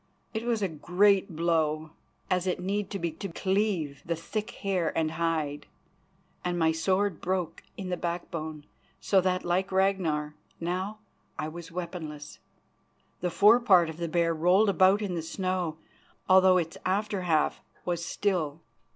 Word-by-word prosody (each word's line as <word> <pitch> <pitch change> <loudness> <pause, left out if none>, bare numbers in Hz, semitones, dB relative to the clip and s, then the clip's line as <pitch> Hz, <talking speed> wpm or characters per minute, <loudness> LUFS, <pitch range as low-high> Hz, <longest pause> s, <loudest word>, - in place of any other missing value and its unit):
It 220 +1 -3
was 230 -3 0
a - - +2
great 185 +3 +2
blow, 160 -2 0 0.4
as 185 0 0
it 180 - 0
need 195 +2 -2
to 200 - -3
be 170 -3 -2
to 165 +5 -6
cleave 185 -6 -1
the 170 - -1
thick 215 +7 -4 0.2
hair 185 -4 +1
and 160 -1 +1
hide, 160 -3 -1 0.8
and 175 0 -1
my 160 -1 +3
sword 185 +3 0
broke 185 -2 -2 0.2
in 190 -2 -5
the 180 - -1
backbone, 160 -3 -4 0.3
so 195 -2 +3
that, 185 0 0
like 185 +3 0
Ragnar, 185 -6 +1 0.3
now 185 +5 -2 0.4
I 155 - -3
was 170 +1 -9
weaponless. 160 -4 -6 0.8
The 180 - -1
forepart 200 -4 +5
of 160 - -12
the 170 0 -2
bear 165 0 +2
rolled 180 +6 +4
about 195 +2 +4
in 195 -3 -2
the 170 - -2
snow, 180 -1 -2 0.5
although 185 0 +6
its 165 -2 -2
after 200 +1 0
half 160 -4 +1 0.2
was 175 -1 -1
still. 170 -7 -1
180 Hz, 150 wpm, -28 LUFS, 160-190 Hz, 0.8 s, although